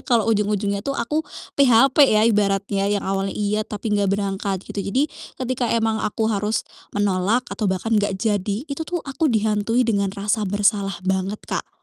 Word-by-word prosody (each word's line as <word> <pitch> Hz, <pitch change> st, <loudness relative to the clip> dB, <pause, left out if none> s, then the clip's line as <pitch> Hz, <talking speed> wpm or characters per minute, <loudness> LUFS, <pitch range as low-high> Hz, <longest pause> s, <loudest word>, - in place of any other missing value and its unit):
kalau 235 Hz, -5 st, +2 dB
ujung-ujungnya 205 Hz, -1 st, 0 dB
tuh 275 Hz, +5 st, -3 dB
aku 300 Hz, +7 st, 0 dB, 0.4 s
PHP," 250 Hz, 0 st, +5 dB
ya 215 Hz, 0 st, +4 dB
ibaratnya, 200 Hz, -2 st, +1 dB
yang 205 Hz, -1 st, 0 dB
awalnya 195 Hz, 0 st, -2 dB
iya, 210 Hz, +1 st, -1 dB
tapi 210 Hz, +1 st, -3 dB
enggak 200 Hz, -1 st, +2 dB
berangkat, 195 Hz, -1 st, -2 dB
gitu. 200 Hz, -, -5 dB
Jadi 265 Hz, +10 st, 0 dB, 0.2 s
ketika 255 Hz, -2 st, -2 dB
emang 225 Hz, -1 st, 0 dB
aku 220 Hz, +1 st, -1 dB
harus 210 Hz, +2 st, -1 dB, 0.3 s
menolak 205 Hz, +4 st, +1 dB
atau 210 Hz, -4 st, -1 dB
bahkan 190 Hz, +4 st, -1 dB
enggak 205 Hz, -2 st, +2 dB
jadi, 205 Hz, +3 st, -1 dB
itu 280 Hz, 0 st, -6 dB
tuh 350 Hz, -2 st, -3 dB
aku 295 Hz, +3 st, 0 dB
dihantui 220 Hz, +1 st, +1 dB
dengan 200 Hz, -4 st, +1 dB
rasa 205 Hz, +2 st, 0 dB
bersalah 200 Hz, -1 st, +1 dB
banget, 190 Hz, +2 st, 0 dB
Kak. -, -, -4 dB
210 Hz, 165 wpm, -22 LUFS, 200-230 Hz, 0.4 s, PHP